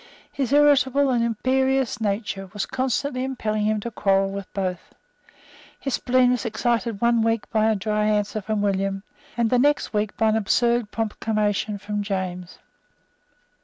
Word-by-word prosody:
His 270 -3 -2
irritable 285 -1 +4
and 240 -2 +2
imperious 260 +2 0
nature 200 -2 -2
was 205 - -2
constantly 260 0 -1
impelling 215 -5 -2
him 215 0 +1
to 235 - -5
quarrel 195 -2 +1
with 195 -1 -7
both. 185 -3 -4 0.8
His 270 - -3
spleen 250 0 +3
was 250 -4 0
excited 230 -1 -1
one 235 -1 +3
week 225 -1 0
by 220 0 +2
a 220 - +2
dry 210 +1 -1
answer 210 0 0
from 210 +1 -2
William, 195 0 -1 0.3
and 235 -2 +1
the 250 - +4
next 290 0 +2
week 210 0 -1
by 220 -1 +3
an 215 - +2
absurd 235 +2 +1
proclamation 215 -1 -1
from 205 +1 -4
James. 185 -3 -4
220 Hz, 155 wpm, -23 LUFS, 205-245 Hz, 0.8 s, irritable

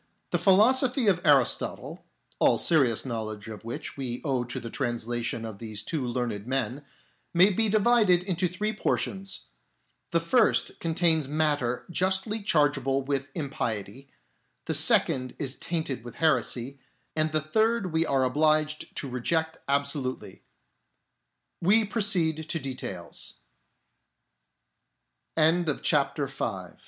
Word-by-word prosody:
The - - +1
philosophy 245 +6 +4
of 185 -3 +2
Aristotle, 140 -6 +1 0.4
all - - +4
serious 135 -10 +2
knowledge 110 -4 -5
of 110 -1 -9
which 115 +4 -6
we 125 -3 -4
owe 130 -4 0
to 120 - -5
the 115 - -8
translation 120 -2 -3
of 110 -3 -8
these 110 -2 -6
two 150 +3 -3
learned 120 -4 -3
men, 130 +1 -2 0.5
may 185 +4 +6
be 220 +3 +1
divided 210 -4 +3
into 180 -1 -1
three 205 +5 -3
portions: 195 -2 -2 0.7
the - - +2
first - - +1
contains 165 -3 +2
matter 145 -5 0
justly 190 +5 0
chargeable 145 -7 +1
with 140 0 -2
impiety, 135 - -4 0.6
the - - -1
second 130 -1 +4
is 135 -4 -2
tainted 155 -8 -3
with 120 - -10
heresy, 140 -4 0 0.4
and 155 0 +1
the 155 - +1
third 220 +4 0
we 160 0 +3
are 135 -5 +1
obliged 155 +3 +1
to 140 - -3
reject 160 +6 -2
absolu 140 -2 -2
145 Hz, 105 wpm, -27 LUFS, 125-175 Hz, 0.7 s, may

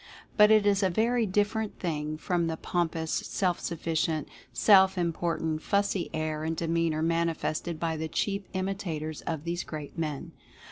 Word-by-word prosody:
But 210 0 +7
it 215 -1 +5
is 200 -1 +3
a 190 - +3
very 230 +4 +1
different 205 +2 0
thing 155 -3 -3
from 170 +1 0
the 160 0 -2
pompous, 165 -2 -1
self 180 -3 0
sufficient, 160 -2 -1 0.2
self 190 -2 +5
important, 165 -2 -1
fussy 200 -2 0
air 155 -1 -2
and 160 0 -2
demeanor 165 -1 0
manifested 165 0 -1
by 165 -1 -1
the 160 +1 -3
cheap 200 +4 -2
imitators 185 -5 -3
of 160 -3 -2
these 170 +1 -2
great 155 +1 -7
men. 150 -4 -3
170 Hz, 150 wpm, -28 LUFS, 160-195 Hz, 0.2 s, But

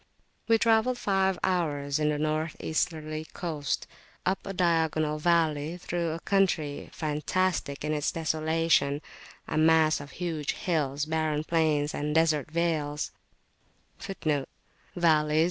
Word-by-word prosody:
We 225 0 +5
travelled 225 +2 +3
five 190 -3 +1
hours 150 -6 0
in 150 0 +2
a 150 - -1
North 155 +1 -1
Easterly 155 -1 -2
course 155 -6 -2 0.5
up 190 +1 +1
a - - -2
diagonal 160 -4 +1
valley,[FN#18] 160 0 +1
through 170 -1 -2
a 165 - -5
country 175 -7 0
fantastic 155 -1 -1
in 155 - 0
its 150 -1 0
desolation 160 -2 +1 0.4
a - - 0
mass 160 -1 +4
of 145 - -9
huge 165 -4 -2
hills, 145 -4 -1
barren 155 -1 0
plains, 155 -3 +1
and 150 +1 -2
desert 160 -3 +2
vales. 155 -3 -1
155 Hz, 115 wpm, -28 LUFS, 150-170 Hz, 0.5 s, We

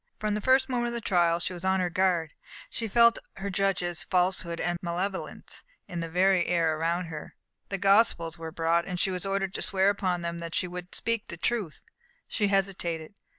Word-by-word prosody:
From 215 -1 -1
the 210 - -1
first 260 +3 +4
moment 245 -2 0
of 235 - -3
the 235 - -2
trial 170 -4 +2
she 185 - -3
was 175 0 -8
on 190 0 +2
her 180 -1 0
guard. 175 -3 +1 0.4
She 225 - -3
felt 235 +2 +5 0.2
her 200 +1 -4
judges' 185 -3 0
falsehood 180 -2 +1
and 175 0 -1
malevolence 185 +3 -4 0.2
in 175 - -5
the 165 0 -3
very 185 +1 +3
air 165 -3 +2
around 170 +3 0
her. 155 -2 -8 0.3
The 195 - -2
Gospels 195 -4 +3
were 165 -1 -7
brought, 165 +1 +1
and 180 -2 -3
she 190 - +1
was 185 +1 -3
ordered 195 -1 -1
to - - -4
swear 195 0 +3
upon 185 -3 -1
them 170 0 -3
that 170 -1 -5
she 180 - +1
would 180 0 -7
speak 230 -2 -2
the 170 - -7
truth. 200 -3 -2 0.4
She 205 - 0
hesitated. 190 -4 -1
180 Hz, 200 wpm, -28 LUFS, 170-195 Hz, 0.4 s, felt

